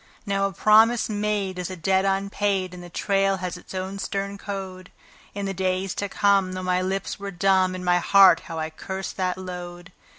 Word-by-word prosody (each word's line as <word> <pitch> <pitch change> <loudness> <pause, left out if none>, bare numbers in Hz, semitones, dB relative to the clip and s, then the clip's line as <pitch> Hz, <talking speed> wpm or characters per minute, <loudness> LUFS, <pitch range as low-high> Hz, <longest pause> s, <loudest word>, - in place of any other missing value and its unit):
Now 195 -1 +1
a - - -6
promise 220 +5 +4
made 205 -3 -2
is 180 - -3
a 185 - -5
debt 190 +3 +1
unpaid, 195 -1 0
and 180 - -9
the 175 - -10
trail 195 +1 +1
has 180 -1 -4
its 180 - -11
own 190 +1 -4
stern 195 +3 -3
code. 190 -2 -7 0.4
In 200 -1 -3
the 195 - -2
days 185 0 -1
to 200 - -3
come, 195 -2 +2
though 185 0 -5
my 180 0 +1
lips 190 +2 -3
were 200 0 -5
dumb, 185 0 +2
in 185 - -6
my 180 0 +3
heart 195 +1 +6
how 165 - -6
I 160 0 -3
cursed 190 +4 -6
that 185 -1 -1
load. 180 -1 -8
190 Hz, 200 wpm, -24 LUFS, 185-195 Hz, 0.4 s, heart